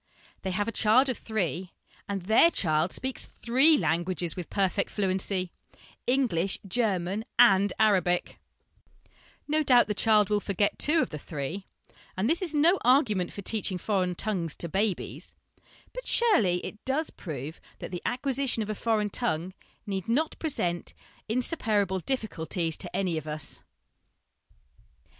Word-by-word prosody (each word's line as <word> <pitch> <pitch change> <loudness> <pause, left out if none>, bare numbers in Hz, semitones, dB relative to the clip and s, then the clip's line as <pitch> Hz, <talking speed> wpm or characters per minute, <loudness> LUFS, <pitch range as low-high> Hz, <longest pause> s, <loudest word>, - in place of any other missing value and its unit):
They 190 - -3
have 205 +3 -1
a - - -1
child 235 +5 +3
of 255 - -2
three, 185 - -3 0.4
and 195 -2 -3
their 220 - +5
child 160 - 0
speaks 260 0 -2
three 270 +7 +3
languages 175 - -1
with 180 -3 -6
perfect 200 0 0
fluency 190 -2 -1 0.6
English, 225 -9 +1
German, 195 -2 -1
and 200 -5 +6
Arabic 185 -5 +2 0.7
I - - -29 0.4
No 305 +1 +2
doubt 250 -5 +5
the 210 - -2
child 210 -1 +3
will 210 - +3
forget 200 0 -1
two 320 +2 +3
of - - -6
the 150 - -5
three, 155 +7 -5 0.5
and 190 +4 +1
this 330 +7 +1
is 360 -4 0
no 320 +5 +4
argument 230 - +3
for 200 - -7
teaching 205 -3 -1
foreign 185 -2 -1
tongues 175 -6 -1
to 170 - -3
babies, 195 +3 -2 0.6
but - - -7
surely 215 - +3
it 210 - -9
does 295 +4 -1
prove 155 -2 -7 0.2
that - - -8
the 180 - -5
acquisition 260 -2 0
of 215 - -4
a - - -1
foreign 215 -1 0
tongue 185 -7 -1 0.3
need 195 -1 -4
not 305 +7 +1
present 175 - -2 0.3
insuperable 215 - 0
difficulties 175 - -2
to - - -7
any 180 -5 0
of 155 - -12
us. 150 -2 -3
205 Hz, 150 wpm, -28 LUFS, 180-245 Hz, 0.7 s, and